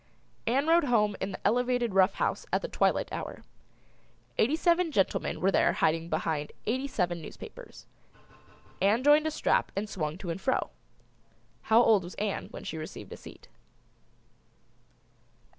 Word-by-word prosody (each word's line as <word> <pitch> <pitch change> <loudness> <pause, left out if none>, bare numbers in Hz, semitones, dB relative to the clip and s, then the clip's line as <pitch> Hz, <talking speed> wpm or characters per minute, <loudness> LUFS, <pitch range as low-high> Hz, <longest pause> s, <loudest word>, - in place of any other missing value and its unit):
Ann 265 +5 +2
rode 330 0 +4
home 210 -5 +2
in 195 - -2
the 185 - -7
Elevated 245 -2 +1
Rough 190 -1 +4
House - - -1
at - - +1
the - - -2
twilight - - +1
hour. - - -6 1.0
Eighty 265 +8 +3
seven 340 0 +2
gentlemen 195 -9 0
were 195 - +2
there - - +3
hiding 165 +1 0
behind 155 -2 -2
eighty 260 +5 -1
seven 175 -9 -1
newspapers. 155 - -11 1.0
Ann 210 +6 +3
joined 295 +2 +5
a - - +2
strap 310 - +1
and 205 +2 -2
swung 160 -6 -3
to 185 -3 -5
and 190 - -5
fro. 260 - 0 1.0
How 225 +2 +6
old 215 -5 +4
was 175 - -9
Ann 205 -1 -3
when - - -9
she 160 - -5
received 155 - -8
a - - -9
seat? - - -13
210 Hz, 155 wpm, -29 LUFS, 180-260 Hz, 1.0 s, How